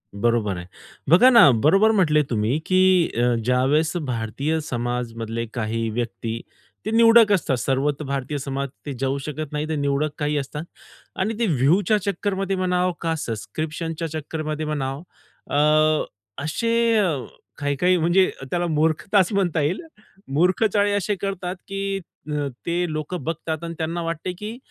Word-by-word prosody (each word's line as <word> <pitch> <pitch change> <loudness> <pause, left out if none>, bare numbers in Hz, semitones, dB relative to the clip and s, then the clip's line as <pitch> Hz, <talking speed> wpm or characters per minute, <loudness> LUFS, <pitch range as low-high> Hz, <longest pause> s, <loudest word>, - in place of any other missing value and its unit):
बरोबर 105 -3 +1
आहे. 90 - -7 0.4
बघा 185 +10 +7
ना 235 - +8
बरोबर 165 - +4
म्हटले 160 -8 +3
तुम्ही 115 +6 0
की 185 -2 +4
अ, 120 0 +3
ज्यावेळेस 135 +7 +2
भारतीय 135 +3 -2
समाजामधले 115 -3 -3
काही 115 -1 -2
व्यक्ती, 115 0 -4 0.4
ते 215 - -2
निवडक 230 -1 +6
असतात 150 -9 +1
सर्वत्र 140 +4 -1
भारतीय 140 +1 -3
समाज 140 0 -3 0.2
ते 145 - -4
जाऊ 135 +1 0
शकत 150 0 -5
नाही. 150 +1 -2
ते 160 - -1
निवडक 140 +1 0
काही 150 0 0
असतात 145 +2 -4 0.6
आणि 215 +3 -1
ते 235 - +2
व्ह्यूच्या 175 - +3
चक्करमध्ये 195 0 -1
म्हणाव 180 -1 +1
का, 165 -1 0
सब्सक्रिप्शनच्या 155 +7 -4
चक्करमध्ये 155 0 -4
म्हणावं, 140 -1 -3 0.5
अ, 155 +1 +3 0.4
असे 230 +9 -1 0.2
अ, 180 -8 +2 0.4
काही-काही 150 +6 +1
म्हणजे 175 +3 +3 0.2
त्याला 175 0 0
मूर्खताच 165 +5 +2
म्हणता 175 -6 +1
येईल. 155 - 0 0.5
मूर्ख 180 +7 +3
चाळे 205 0 +3
असे 205 +1 0
करतात 190 -2 -3
की 195 0 -2 0.3
अ, 150 -1 -1 0.2
ते 175 +1 0
लोकं 155 +3 -4
बघतात 160 0 -3
आणि 170 0 -4
त्यांना 165 +1 -2
वाटते 165 +2 -3
की 215 +3 -6
155 Hz, 145 wpm, -23 LUFS, 135-185 Hz, 0.6 s, ना